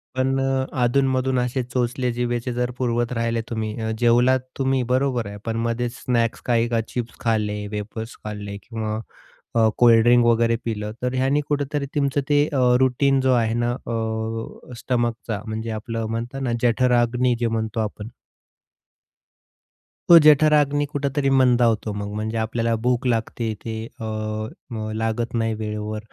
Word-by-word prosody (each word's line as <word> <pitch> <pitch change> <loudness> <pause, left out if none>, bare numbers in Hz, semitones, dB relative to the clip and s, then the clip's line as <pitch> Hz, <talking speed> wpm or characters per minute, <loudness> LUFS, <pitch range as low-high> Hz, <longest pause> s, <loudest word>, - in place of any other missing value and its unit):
पण 135 +1 +1
अ, 135 0 0 0.2
अधून-मधून 130 0 +2
असे 125 +1 -1
चोचले 125 0 -1
जिभेचे 120 0 -2
जर 125 0 -1
पुरवत 120 -1 0
राहिले 115 0 -1
तुम्ही 110 -1 -3
अ, 110 - -2
जेवलात 120 +2 +4 0.2
तुम्ही, 135 -1 +1
बरोबर 130 -4 +1
आहे. 100 0 -7
पण 115 0 -2
मधेच 120 +1 -2
स्नॅक्स 120 -1 0
काही 120 -1 +2
का 115 -1 +1
चिप्स 120 -1 -5
खाल्ले, 105 -2 -1
वेफर्स 110 +2 -5
खाल्ले 105 -1 -6
किंवा 110 -2 -4 0.6
अ, 110 -1 +5
कोल्डड्रिंक 120 0 +6
वगैरे 115 0 +3
पिलं, 105 -2 -3
तर 125 0 -1
ह्याने 135 +3 +2
कुठेतरी 145 -1 -1
तुमचं 140 -1 +1
ते 145 0 +4
अ, 135 - +1 0.2
रूटीन 135 +1 +3
जो 130 0 +2
आहे 115 -2 +2
ना, 120 0 0
अ, 115 0 -4
स्टमकचा. 120 -4 -2
म्हणजे 110 +1 -4
आपलं 110 +1 -4
म्हणतात 120 +4 -4
ना 120 -3 -1
जठर-अग्नी 125 0 +2
जे 120 - +1
म्हणतो 110 0 -2
आपण. 105 0 -4 2.0
तो 170 - +11
जठराग्नी 150 -1 +5
कुठेतरी 140 -1 0
मंदावतो 120 -5 +3
मग, 100 0 -4
म्हणजे 110 +2 -3
आपल्याला 115 +1 0
भूक 125 0 +1
लागते 115 -1 -1
ते 115 -1 -4 0.2
अ, - - -6 0.7
मग 110 -3 -4
लागत 115 +2 -2
नाही 115 -1 0
वेळेवर. 105 0 -4
120 Hz, 145 wpm, -23 LUFS, 110-130 Hz, 2.0 s, तो